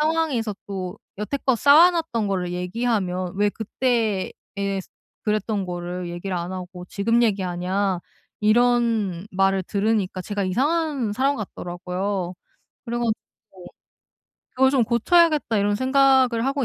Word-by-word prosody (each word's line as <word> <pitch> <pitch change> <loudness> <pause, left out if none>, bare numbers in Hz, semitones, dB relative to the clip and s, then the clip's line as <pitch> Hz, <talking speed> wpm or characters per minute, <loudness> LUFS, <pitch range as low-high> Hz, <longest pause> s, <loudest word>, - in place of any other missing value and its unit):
상황에서 300 -9 0
또 190 -1 -5 0.2
여태껏 260 +2 0
쌓아 310 +6 +7
놨던 250 - -1
거를 180 -2 -1
얘기하면 185 -1 -1
"왜 205 +1 +3
그때에 220 -2 -1 0.9
그랬던 210 -2 -1
거를 175 0 -5
얘기를 175 +2 -4
안 175 +2 -4
하고 180 -1 -7
지금 230 +4 +1
얘기하냐?" 190 -2 0 0.5
이런 225 -5 +2
말을 195 0 +2
들으니까, 200 -1 0
제가 205 +1 -3
이상한 275 - 0
사람 270 +5 +1
같더라고요. 180 -1 -4 0.5
그래 235 +1 -3
가지고 220 -4 -5 0.9
'그걸 265 0 +5
좀 260 -4 +3
고쳐야겠다.' 295 +1 +3
이런 205 +1 +2
생각을 260 -2 +3
하고 275 0 0
210 Hz, 285 characters per minute, -23 LUFS, 185-245 Hz, 0.9 s, 쌓아